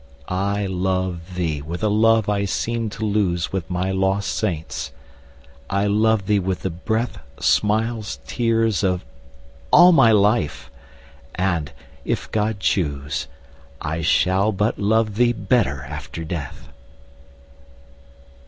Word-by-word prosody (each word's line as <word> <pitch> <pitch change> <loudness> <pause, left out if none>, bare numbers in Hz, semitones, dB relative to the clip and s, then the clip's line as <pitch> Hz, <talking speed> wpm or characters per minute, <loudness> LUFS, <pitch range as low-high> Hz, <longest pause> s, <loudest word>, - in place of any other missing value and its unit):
I 100 +2 -1
love 95 -1 -2
thee 80 -5 -1
with 85 +6 -6
a - - +3
love 110 +1 +3
I 100 -1 +1
seemed 115 +3 -2
to 110 - -3
lose 95 -5 0
With 95 -1 -3
my 90 +1 -1
lost 95 +1 0
saints, 85 -7 -3 0.8
I 100 +1 +1
love 105 0 +2
thee 105 0 +2
with 95 -1 -2
the 95 - -2
breath, 110 +7 -2 0.2
Smiles, 110 +1 +1
tears, 115 -5 +1
of 90 -6 0 0.6
all 180 - +8
my 115 -9 +6
life! 100 -9 +1 0.6
and, 85 -6 -1 0.3
if - - -3
God 110 -1 0
choose, 70 -8 -1 0.5
I 80 +2 -3
shall 95 +5 +2
but 105 +2 -1
love 110 0 +1
thee 120 0 +4
better 100 - 0
after 75 +3 -7
death. 75 -5 -6
100 Hz, 125 wpm, -22 LUFS, 90-110 Hz, 0.8 s, all